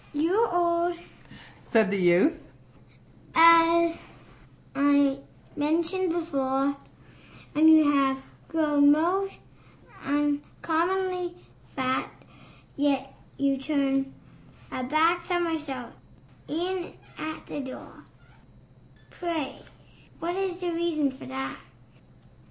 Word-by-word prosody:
"You 315 Hz, +4 st, +1 dB
are 350 Hz, -6 st, +2 dB
old," 345 Hz, -, -5 dB, 0.7 s
said 220 Hz, -3 st, +3 dB
the 200 Hz, -, 0 dB
youth, 175 Hz, -, +4 dB, 1.0 s
"as 335 Hz, 0 st, +6 dB, 0.7 s
I 285 Hz, -1 st, +3 dB, 0.4 s
mentioned 330 Hz, +4 st, 0 dB
before, 280 Hz, -4 st, -1 dB, 0.8 s
And 310 Hz, +2 st, +5 dB
you 310 Hz, -2 st, +6 dB
have 270 Hz, -1 st, +2 dB, 0.3 s
grown 295 Hz, -3 st, +3 dB
most 365 Hz, +6 st, 0 dB, 0.6 s
uncommonly 340 Hz, +5 st, -1 dB, 0.4 s
fat; 260 Hz, -1 st, -1 dB, 0.7 s
Yet 275 Hz, -2 st, 0 dB, 0.2 s
you 275 Hz, -1 st, +1 dB
turned 270 Hz, -1 st, 0 dB, 0.6 s
a 255 Hz, -, -4 dB
back 325 Hz, +6 st, +2 dB
somersault 320 Hz, -8 st, -3 dB, 0.5 s
in 355 Hz, +3 st, -3 dB, 0.2 s
at 315 Hz, 0 st, -6 dB
the -, -, -6 dB
door 265 Hz, -2 st, -9 dB, 1.1 s
Pray 330 Hz, -6 st, -4 dB, 0.6 s
what 345 Hz, +2 st, -3 dB
is 380 Hz, -2 st, -2 dB
the 355 Hz, -1 st, -3 dB
reason 330 Hz, -4 st, 0 dB
for 260 Hz, -, -12 dB
that?" 135 Hz, +1 st, -5 dB
310 Hz, 90 wpm, -26 LUFS, 275-340 Hz, 1.1 s, as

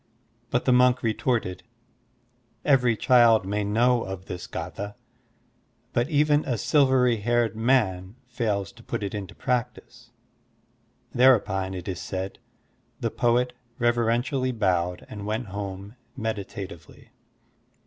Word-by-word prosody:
But 125 Hz, -, 0 dB
the 130 Hz, -, +4 dB
monk 125 Hz, 0 st, +4 dB
retorted, 115 Hz, -3 st, -1 dB, 1.0 s
"Every 125 Hz, -5 st, +3 dB
child 120 Hz, -5 st, +5 dB
may 105 Hz, +2 st, -1 dB
know 120 Hz, +4 st, +2 dB
of 95 Hz, -2 st, -6 dB
this 90 Hz, -2 st, -7 dB
gfitha, 100 Hz, +1 st, -6 dB, 1.0 s
but 120 Hz, +4 st, +1 dB
even 150 Hz, -1 st, +3 dB
a 125 Hz, -4 st, -2 dB
silvery 130 Hz, -1 st, +3 dB
haired 120 Hz, +1 st, +1 dB
man 110 Hz, -5 st, +1 dB
fails 115 Hz, -5 st, -2 dB
to 120 Hz, -1 st, -17 dB
put 115 Hz, -2 st, -4 dB
it 100 Hz, -, -4 dB
into 100 Hz, -3 st, -6 dB
practice." 120 Hz, -1 st, -3 dB, 1.0 s
There 130 Hz, +1 st, +7 dB
upon, 95 Hz, -3 st, -3 dB
it 90 Hz, -, -7 dB
is 95 Hz, -3 st, -4 dB
said, 95 Hz, +1 st, -5 dB, 0.6 s
the -, -, -2 dB
poet 125 Hz, +1 st, +1 dB, 0.2 s
reverentially 120 Hz, +2 st, +1 dB
bowed 90 Hz, -5 st, 0 dB
and 105 Hz, -1 st, -7 dB
went 110 Hz, 0 st, -3 dB
home 100 Hz, +1 st, -6 dB, 0.2 s
meditatively. 100 Hz, -6 st, -6 dB
115 Hz, 120 wpm, -25 LUFS, 100-125 Hz, 1.0 s, There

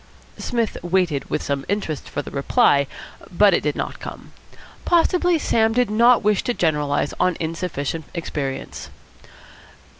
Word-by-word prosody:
Psmith 230 Hz, -3 st, -2 dB
waited 175 Hz, -5 st, 0 dB
with -, -, -2 dB
some 140 Hz, -1 st, -2 dB
interest 195 Hz, -7 st, -3 dB
for 145 Hz, -, -4 dB
the -, -, -9 dB
reply, 140 Hz, -, +3 dB, 0.4 s
but 200 Hz, +2 st, +5 dB
it -, -, +2 dB
did 150 Hz, -1 st, -1 dB
not -, -, -4 dB
come. -, -, -9 dB, 0.5 s
Possibly 355 Hz, 0 st, +3 dB
Sam 225 Hz, -6 st, +2 dB
did 245 Hz, -2 st, +1 dB
not 235 Hz, +2 st, +5 dB
wish 210 Hz, -1 st, +2 dB
to 245 Hz, -, 0 dB
generalise 150 Hz, -3 st, 0 dB
on 185 Hz, -2 st, +2 dB
insufficient 165 Hz, -2 st, -3 dB
experience. 145 Hz, -5 st, -5 dB
180 Hz, 140 wpm, -22 LUFS, 145-225 Hz, 0.5 s, but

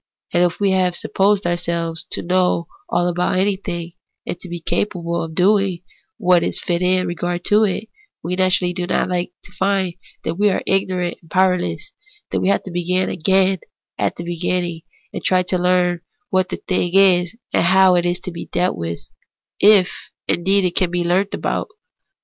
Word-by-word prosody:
And 175 Hz, -, +4 dB
if 175 Hz, -1 st, 0 dB
we 200 Hz, -1 st, +2 dB
have 185 Hz, -2 st, +2 dB
supposed 195 Hz, +2 st, +1 dB
ourselves 170 Hz, -1 st, -2 dB
to -, -, -2 dB
know 180 Hz, -1 st, +1 dB, 0.2 s
all 175 Hz, -, +1 dB
about 180 Hz, +1 st, 0 dB
anything, 185 Hz, -3 st, -1 dB, 0.3 s
and 175 Hz, -, -4 dB
to 185 Hz, -, -10 dB
be 175 Hz, 0 st, -5 dB
capable 170 Hz, -1 st, -1 dB
of 160 Hz, -1 st, -6 dB
doing 190 Hz, -1 st, +2 dB, 0.3 s
what 180 Hz, -1 st, +4 dB
is -, -, -2 dB
fit 175 Hz, 0 st, -1 dB
in 185 Hz, 0 st, +2 dB
regard 175 Hz, 0 st, -3 dB
to 210 Hz, +1 st, +4 dB
it, 210 Hz, +2 st, -2 dB, 0.4 s
we 180 Hz, +2 st, -2 dB
naturally 185 Hz, -1 st, +2 dB
do 175 Hz, 0 st, -3 dB
not 185 Hz, -, 0 dB
like 180 Hz, -1 st, -1 dB
to -, -, -15 dB
find 190 Hz, -2 st, +1 dB, 0.3 s
that 165 Hz, +3 st, -3 dB
we 205 Hz, 0 st, +4 dB
are 190 Hz, -, -1 dB
really 195 Hz, 0 st, +4 dB
ignorant 180 Hz, -2 st, -3 dB
and 165 Hz, -, -21 dB
powerless, 185 Hz, -, +1 dB, 0.4 s
that -, -, 0 dB
we -, -, 0 dB
have 200 Hz, -, +2 dB
to 190 Hz, -, -8 dB
begin 180 Hz, +2 st, 0 dB
again 190 Hz, +2 st, +2 dB, 0.4 s
at -, -, 0 dB
the 170 Hz, -, -6 dB
beginning, 175 Hz, 0 st, -2 dB, 0.3 s
and -, -, -5 dB
try 185 Hz, -1 st, +3 dB
to 180 Hz, +1 st, -1 dB
learn 180 Hz, -1 st, +2 dB, 0.3 s
what 185 Hz, -1 st, +2 dB
the -, -, -3 dB
thing 180 Hz, -2 st, -1 dB
is 185 Hz, -1 st, +4 dB, 0.2 s
and -, -, +3 dB
how 190 Hz, +1 st, +6 dB
it 175 Hz, -1 st, +3 dB
is 175 Hz, +1 st, 0 dB
to 185 Hz, -, -6 dB
be 170 Hz, -, -8 dB
dealt 175 Hz, -, 0 dB
^Yith 85 Hz, 0 st, -4 dB, 0.4 s
— -, -, -72 dB
if 200 Hz, -3 st, +6 dB, 0.4 s
indeed 195 Hz, +3 st, +2 dB
any 185 Hz, -, +2 dB
thing -, -, -13 dB
can 185 Hz, -3 st, +2 dB
be 175 Hz, 0 st, -1 dB
learnt 185 Hz, +4 st, +1 dB
about -, -, -2 dB
it. -, -, -35 dB
180 Hz, 195 wpm, -20 LUFS, 175-190 Hz, 0.4 s, how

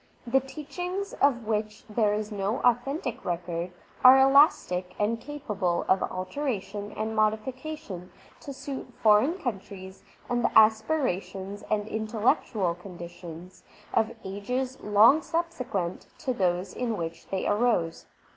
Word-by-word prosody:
The 255 Hz, +3 st, +3 dB
teach 285 Hz, +5 st, -10 dB
ings 370 Hz, +3 st, -3 dB
of 245 Hz, -5 st, +3 dB
which 215 Hz, 0 st, -2 dB
there 215 Hz, -1 st, +2 dB
is 210 Hz, +1 st, -2 dB
no 205 Hz, +3 st, -1 dB
authentic 250 Hz, +2 st, 0 dB
record, 175 Hz, 0 st, -3 dB, 0.3 s
are 255 Hz, +1 st, +10 dB
elastic 265 Hz, -, +4 dB
and 225 Hz, +2 st, 0 dB
capable 210 Hz, -12 st, -2 dB
of 190 Hz, -, +3 dB
alteration 205 Hz, 0 st, -3 dB
and 220 Hz, +1 st, -3 dB
modification 220 Hz, -, -2 dB, 0.3 s
to 280 Hz, -, -8 dB
suit 270 Hz, 0 st, -7 dB
foreign 220 Hz, -, +5 dB
countries 195 Hz, -, -6 dB, 0.3 s
and 240 Hz, -1 st, 0 dB
the -, -, +3 dB
aspirations 205 Hz, -, +2 dB
and 210 Hz, -1 st, 0 dB
intellectual 220 Hz, -, 0 dB
conditions 175 Hz, -1 st, -10 dB, 0.3 s
of 225 Hz, +1 st, +1 dB
ages 250 Hz, +7 st, -3 dB
long 215 Hz, +9 st, +6 dB
subsequent 255 Hz, -, -3 dB
to 260 Hz, -4 st, -2 dB
those 185 Hz, -3 st, 0 dB
in 235 Hz, -3 st, -2 dB
which 165 Hz, 0 st, -5 dB
they 190 Hz, -, -2 dB
arose. 205 Hz, -7 st, +1 dB
215 Hz, 125 wpm, -27 LUFS, 190-260 Hz, 0.3 s, are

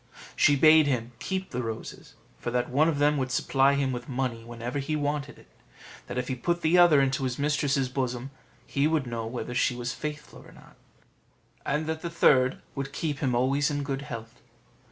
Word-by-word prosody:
She 145 Hz, -, +5 dB
bade 155 Hz, +2 st, +6 dB
him 120 Hz, -3 st, -1 dB
keep 190 Hz, 0 st, -4 dB
the 125 Hz, -, -2 dB
roses, 115 Hz, -2 st, -7 dB, 0.2 s
for -, -, -3 dB
that 125 Hz, 0 st, -1 dB
one 150 Hz, +5 st, +4 dB
of 155 Hz, -, -1 dB
them 145 Hz, +1 st, +3 dB
would 130 Hz, -2 st, -1 dB
supply 135 Hz, +1 st, +3 dB
him 140 Hz, -1 st, 0 dB
with 120 Hz, 0 st, -6 dB
money 125 Hz, -3 st, -2 dB
whenever 120 Hz, +3 st, -5 dB
he 140 Hz, +3 st, -2 dB
wanted 145 Hz, -1 st, -2 dB
it; -, -, -17 dB, 0.6 s
that -, -, -5 dB
if 125 Hz, 0 st, -2 dB
he 130 Hz, -, -1 dB
put 170 Hz, +8 st, -1 dB
the 160 Hz, +2 st, +3 dB
other 175 Hz, -5 st, +7 dB
into 135 Hz, 0 st, +1 dB
his 125 Hz, -2 st, -2 dB
mistress's 145 Hz, -2 st, +1 dB
bosom, 125 Hz, 0 st, -3 dB, 0.3 s
he 140 Hz, +2 st, +1 dB
would 155 Hz, -3 st, 0 dB
know 115 Hz, -2 st, -4 dB
whether 120 Hz, +1 st, -5 dB
she 125 Hz, 0 st, +1 dB
was 120 Hz, +1 st, -3 dB
faithful 150 Hz, 0 st, -7 dB
or -, -, -16 dB
not; -, -, -18 dB, 0.9 s
and 150 Hz, +2 st, 0 dB
that 160 Hz, 0 st, -3 dB
the 170 Hz, -, -4 dB
third 130 Hz, -6 st, +3 dB
would 140 Hz, 0 st, -5 dB
keep 150 Hz, -4 st, -3 dB
him 130 Hz, -3 st, 0 dB
always 135 Hz, +3 st, +2 dB
in 145 Hz, -1 st, -2 dB
good 140 Hz, -1 st, -3 dB
health. 115 Hz, -6 st, -8 dB
135 Hz, 200 wpm, -27 LUFS, 125-150 Hz, 0.9 s, other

